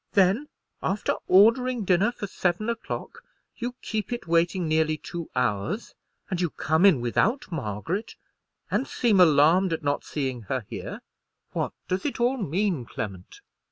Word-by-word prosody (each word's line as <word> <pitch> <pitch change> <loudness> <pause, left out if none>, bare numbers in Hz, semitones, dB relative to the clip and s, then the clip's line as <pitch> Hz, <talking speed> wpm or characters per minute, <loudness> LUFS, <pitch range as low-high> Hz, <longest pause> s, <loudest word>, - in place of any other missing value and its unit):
Then, 200 +9 +3 0.3
after 195 +2 0
ordering 230 +4 +5
dinner 190 +5 +3
for 240 - -6
seven 190 +3 -1
o'clock, 230 - -6 0.4
you 245 +1 -4
keep 220 +1 -3
it 240 -3 -3
waiting 170 +1 +1
nearly 155 0 +2
two 170 +1 -7
hours; 120 - -1 0.3
and 185 -3 -2
you 175 - +1
come 160 +6 +3
in 155 -11 +4
without 225 - 0
Margaret, 160 - -3 0.6
and 270 - 0
seem 220 -6 +2
alarmed 165 +3 +5
at 160 - -3
not 145 0 0
seeing 130 -5 -3
her 130 -5 -1
here. - - -6 0.5
What - - -2
does 185 +1 -1
it 280 - -3
all 245 +3 +2
mean, 185 - 0
Clement?" 100 -5 -7
180 Hz, 150 wpm, -26 LUFS, 150-215 Hz, 0.6 s, ordering